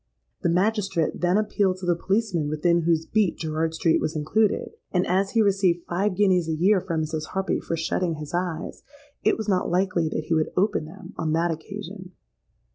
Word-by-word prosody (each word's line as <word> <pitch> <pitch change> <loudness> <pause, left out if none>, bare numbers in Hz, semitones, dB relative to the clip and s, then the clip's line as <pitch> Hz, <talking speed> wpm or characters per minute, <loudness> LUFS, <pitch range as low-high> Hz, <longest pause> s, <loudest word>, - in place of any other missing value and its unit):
The - - +1
magistrate 195 -2 0
then 180 +2 +3
appealed 205 -3 +1
to 185 - -7
the 175 -1 +2
policeman 190 -4 0
within 170 +3 +2
whose 165 -1 +2
beat 205 -3 +1
Gerrard 160 0 -2
Street 160 0 +2
was 155 - -2
included; 205 +8 +1 0.2
and 180 0 +1
as 195 +2 +1
he 225 -2 +4
received 190 -4 +2
five 185 +3 0
guineas 185 -4 +3
a 160 - 0
year 185 +4 +3
from 165 -4 -2
Mrs. 155 0 -3
Harpy 190 0 0
for 165 - -3
shutting 165 +1 -1
his 150 0 -8
eyes, 175 -2 -3 0.4
it - - +3
was 220 - -4
not 185 -3 +1
likely 180 -2 +1
that 155 - -3
he 165 - -1
would 155 -1 +1
open 200 -4 +1
them 190 +5 -11
on 155 -1 0
that 170 +1 +1
occasion. 185 +3 -7
180 Hz, 195 wpm, -25 LUFS, 160-195 Hz, 0.4 s, he